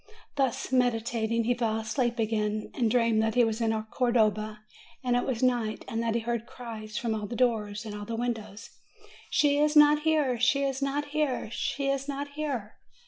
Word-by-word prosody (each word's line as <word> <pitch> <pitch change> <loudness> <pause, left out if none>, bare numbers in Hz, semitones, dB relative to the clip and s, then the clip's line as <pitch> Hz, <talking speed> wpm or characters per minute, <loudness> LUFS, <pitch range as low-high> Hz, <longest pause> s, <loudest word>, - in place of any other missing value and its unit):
Thus 265 -3 0
meditating, 230 -2 +1
he 245 +2 +2
fell 230 -2 0
asleep 235 +2 -1
again, 215 -1 -1
and 235 -4 +1
dreamed 230 -2 +3
that 220 +1 0
he 245 - +5
was 225 0 0
in 225 - +2 0.2
Cordova, 215 -4 +1 0.4
and 245 -1 +1
it 245 - 0
was 255 -2 -1
night, 240 -4 0
and 225 - -2
that 230 -1 0
he 235 - +1
heard 235 0 -3
cries 215 -3 -7
from 235 -4 -1
all 210 -1 -3
the 235 - -5
doors 220 -3 0
and 215 - -6
all 205 0 -6
the 230 +2 -4
windows: 225 -3 -4 0.6
"She 290 -2 +3
is 300 +1 +2
not 295 0 +7
here! 300 -6 +1
She 275 +3 +3
is 270 0 -1
not 285 +1 -1
here! 290 -7 -1
She 275 +3 -2
is 275 0 -1
not 285 0 -4
here 285 -8 -4
235 Hz, 195 wpm, -28 LUFS, 220-270 Hz, 0.6 s, not